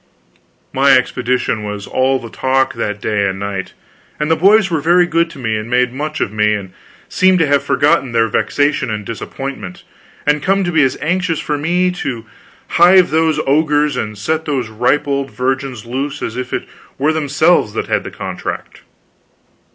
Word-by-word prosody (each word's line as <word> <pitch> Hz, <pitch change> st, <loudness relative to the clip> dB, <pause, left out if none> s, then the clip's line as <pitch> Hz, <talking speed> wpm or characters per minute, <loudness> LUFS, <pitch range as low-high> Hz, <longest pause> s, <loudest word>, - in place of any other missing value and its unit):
My 135 Hz, +1 st, +4 dB
expedition 125 Hz, -3 st, -1 dB
was 105 Hz, -1 st, -5 dB
all 130 Hz, +1 st, +1 dB
the 115 Hz, -3 st, -9 dB
talk 130 Hz, 0 st, +1 dB
that 105 Hz, -3 st, -3 dB
day 105 Hz, -2 st, 0 dB
and 95 Hz, 0 st, -3 dB
that 100 Hz, -, -3 dB
night, 100 Hz, -1 st, -5 dB, 0.5 s
and 150 Hz, +1 st, 0 dB
the -, -, +5 dB
boys 195 Hz, +3 st, +4 dB
were 160 Hz, -3 st, 0 dB
very 175 Hz, +3 st, +4 dB
good 170 Hz, -1 st, +1 dB
to 160 Hz, -, -12 dB
me, 115 Hz, -4 st, -2 dB
and 110 Hz, +2 st, -4 dB
made 125 Hz, 0 st, +1 dB
much 155 Hz, +3 st, -4 dB
of 105 Hz, -, -2 dB
me, 105 Hz, 0 st, +2 dB
and 95 Hz, -3 st, -7 dB, 0.3 s
seemed 185 Hz, 0 st, +3 dB
to 165 Hz, -, +3 dB
have 145 Hz, -1 st, +2 dB
forgotten 145 Hz, -1 st, +1 dB
their 115 Hz, -1 st, +2 dB
vexation 145 Hz, +5 st, 0 dB
and 105 Hz, -1 st, -4 dB
disappointment, 115 Hz, -3 st, -7 dB, 0.4 s
and 150 Hz, 0 st, +2 dB
come 195 Hz, +1 st, +1 dB
to 175 Hz, -, -1 dB
be 160 Hz, -2 st, +3 dB
as 130 Hz, -2 st, +1 dB
anxious 175 Hz, +1 st, 0 dB
for 150 Hz, -, -2 dB
me 175 Hz, +5 st, +1 dB
to 125 Hz, -10 st, -5 dB, 0.4 s
hive 180 Hz, +1 st, +5 dB
those 160 Hz, 0 st, +2 dB
ogres 150 Hz, 0 st, +2 dB
and 110 Hz, -4 st, -4 dB
set 160 Hz, +10 st, -2 dB
those 130 Hz, -6 st, -2 dB
ripe 125 Hz, +7 st, +1 dB
old 140 Hz, -1 st, -1 dB
virgins 130 Hz, 0 st, -3 dB
loose 135 Hz, +4 st, -4 dB
as 115 Hz, -, -4 dB
if 125 Hz, 0 st, -5 dB
it -, -, -3 dB, 0.3 s
were 150 Hz, +4 st, +1 dB
themselves 155 Hz, -5 st, +2 dB
that -, -, -2 dB
had -, -, -1 dB
the -, -, -6 dB
contract. -, -, -6 dB
135 Hz, 185 wpm, -16 LUFS, 115-160 Hz, 0.5 s, the